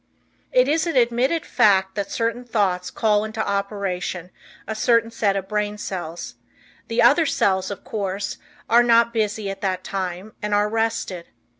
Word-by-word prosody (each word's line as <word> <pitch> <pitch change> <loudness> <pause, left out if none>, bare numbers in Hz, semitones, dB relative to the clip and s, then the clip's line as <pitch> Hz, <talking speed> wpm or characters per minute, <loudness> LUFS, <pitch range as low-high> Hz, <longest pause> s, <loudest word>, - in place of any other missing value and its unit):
It - - +4
is 315 +3 +1
an 330 - -2
admitted 250 +6 +2
fact 190 -2 +3
that 200 -1 -3
certain 230 +1 -2
thoughts 195 -6 0
call 210 0 +1
into 220 0 -3
operation 195 -3 -3 0.4
a 220 - -2
certain 230 +1 +2
set 205 -3 +1
of 190 -1 -3
brain 210 0 -2
cells; 175 -5 -5 0.5
the 230 +1 +1
other 295 +7 +5
cells, 190 -6 +1
of 200 - -7
course, 200 -2 -3 0.3
are 235 +1 +6
not 235 -1 +4
busy 215 -2 -1
at 195 - -9
that 185 -2 -1
time 185 +2 -4
and 210 0 0
are 205 0 +2
rested. 225 -5 -2
210 Hz, 160 wpm, -22 LUFS, 190-230 Hz, 0.5 s, are